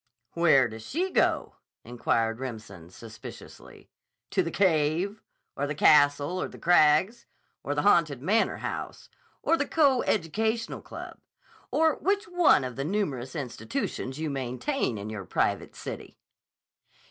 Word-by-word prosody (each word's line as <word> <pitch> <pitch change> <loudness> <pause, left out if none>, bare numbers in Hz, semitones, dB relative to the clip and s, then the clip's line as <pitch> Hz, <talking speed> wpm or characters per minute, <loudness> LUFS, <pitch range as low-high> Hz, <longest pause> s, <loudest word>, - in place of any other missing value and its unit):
"Where 155 -7 +4
does 110 0 -9
she 355 - -2
go?" - - +1 0.3
inquired 115 -1 -1
Remsen 110 -9 -8
suspiciously. 110 +3 -12 0.4
"To - - +2
the - - -2
Cave? 180 +3 +1 0.3
Or 145 - -2
the 145 - -3
Castle 145 +3 +4
on - - -3
the - - -12
Crags? 175 +7 +3 0.3
Or 145 - -3
the 145 - 0
Haunted 165 -9 +3
Manor 200 - +1
House? - - -6 0.3
Or 330 - +3
the 285 - -1
Co 280 -6 +3
educational 220 +6 -1
Club? - - -9 0.5
Or 320 -2 +2
which 400 +4 0
one 350 - +4
of 125 -1 -6
the 135 - -2
numerous 145 -8 -2
institutions 125 0 -4
you 155 -1 -3
maintain 130 - -2
in 105 +2 -6
your 105 -3 -6
private - - -1
city?" - - -8
150 Hz, 135 wpm, -27 LUFS, 125-210 Hz, 0.5 s, Where